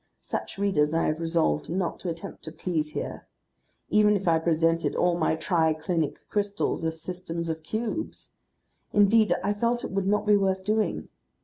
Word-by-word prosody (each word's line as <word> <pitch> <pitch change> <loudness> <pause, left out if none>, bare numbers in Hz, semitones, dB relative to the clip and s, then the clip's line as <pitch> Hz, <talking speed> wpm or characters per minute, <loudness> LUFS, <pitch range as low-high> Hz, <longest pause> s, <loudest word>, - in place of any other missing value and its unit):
Such - - -4
readers 165 -6 +2
I 165 - +2
have 155 +1 0
resolved 165 - 0
not 175 0 -2
to 180 - -4
attempt 165 0 -7
to 160 - -6
please 155 -2 -2
here. - - -5 0.6
Even 210 0 +5
if 195 -2 -2
I 165 -1 +4
presented 165 0 +1
all 175 -1 +2
my 160 -2 +1
tri 160 -2 +1
clinic 160 -1 -2
crystals 205 -4 -1
as 160 0 -2
systems 170 -1 -4
of 160 0 -3
cubes! 220 - -4 0.6
Indeed 210 +1 +5
I 205 +2 +1
felt 235 +3 0
it - - -4
would 195 0 -1
not 210 +1 +2
be 210 -1 +5
worth 190 -1 0
doing. 215 +2 0
175 Hz, 175 wpm, -27 LUFS, 160-205 Hz, 0.6 s, Even